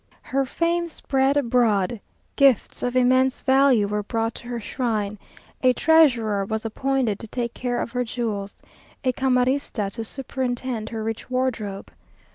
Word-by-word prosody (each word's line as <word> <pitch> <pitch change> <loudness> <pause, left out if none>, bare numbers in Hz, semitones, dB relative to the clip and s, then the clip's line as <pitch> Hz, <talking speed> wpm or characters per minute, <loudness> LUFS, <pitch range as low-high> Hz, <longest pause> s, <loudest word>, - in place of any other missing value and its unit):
Her 275 0 0
fame 340 +4 0
spread 275 -3 0
abroad. 230 -5 +2 0.3
Gifts 275 -6 +3
of 245 0 -2
immense 255 +1 +3
value 265 -5 +4
were 210 +1 -1
brought 225 +2 -2
to 240 - -12
her 240 -1 -3
shrine. 215 -3 -2 0.4
A 255 -1 +5
treasurer 245 -11 +4
was 220 +3 -3
appointed 255 -2 0
to 225 - -7
take 235 +1 -3
care 245 -1 -2
of - - -3
her 250 0 0
jewels; 220 -4 -4 0.5
a 255 - +2
camarista 255 -5 0
to 225 +2 -5
superintend 250 -2 -3
her 225 -1 -4
rich 225 +2 -4
wardrobe. 235 -6 -2
245 Hz, 145 wpm, -24 LUFS, 220-265 Hz, 0.5 s, A